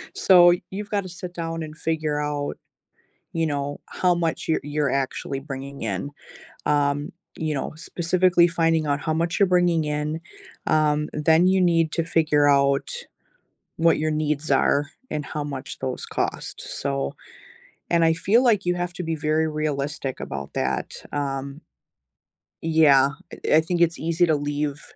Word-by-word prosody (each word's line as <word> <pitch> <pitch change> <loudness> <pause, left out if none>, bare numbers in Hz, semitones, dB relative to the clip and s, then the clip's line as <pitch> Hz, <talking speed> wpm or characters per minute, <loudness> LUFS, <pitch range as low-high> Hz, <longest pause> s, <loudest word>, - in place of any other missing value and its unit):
So, 175 -2 +7 0.2
you've 205 +1 -5
gotta 200 -3 -2
sit 175 0 -8
down 165 -1 -4
and 155 0 -9
figure 155 -2 -1
out, 145 -1 -3 0.8
you 165 -1 0
know, 145 -1 -3
how 180 -1 +1
much 165 -2 -2
you're 160 - +2
you're 145 -1 0
actually 135 0 -2
bringing 135 -1 -7
in, 110 +5 -3 0.6
um, 145 0 +1 0.3
you 155 -1 -1
know, 135 - -3
specifically 175 +2 +2
finding 165 -2 +1
out 145 0 +1
how 155 - -1
much 170 +4 -1
you're 200 - +5
bringing 175 -3 +3
in, 150 +2 -2 0.5
um, 150 -1 +2
then 160 +3 +4
you 190 0 +3
need 165 -3 +3
to 165 - 0
figure 155 -3 +2
out 140 -1 +3 0.9
what 165 0 +3
your 155 +1 0
needs 150 -1 -1
are 140 +1 +3 0.2
and 150 -1 -3
how 150 -2 -4
much 135 -2 -6
those 130 -1 -4
cost, - - -3
so 140 0 -3 0.8
and 170 -1 +4
I 160 - +4
feel 200 +9 +3
like 215 -5 +3
you 180 - +2
have 175 0 -3
to 180 - -5
be 165 - -1
very 155 +1 +1
realistic 150 -3 -3
about - - -6
that, - - -2 0.2
um 140 0 -3 1.0
Yeah, 155 -4 +5 0.3
eh - - +4
I 160 - +5
think 175 +1 -2
it's 170 -1 +2
easy 165 +2 +2
to 160 -2 +2
leave 145 0 -2
155 Hz, 160 wpm, -24 LUFS, 145-170 Hz, 1.0 s, So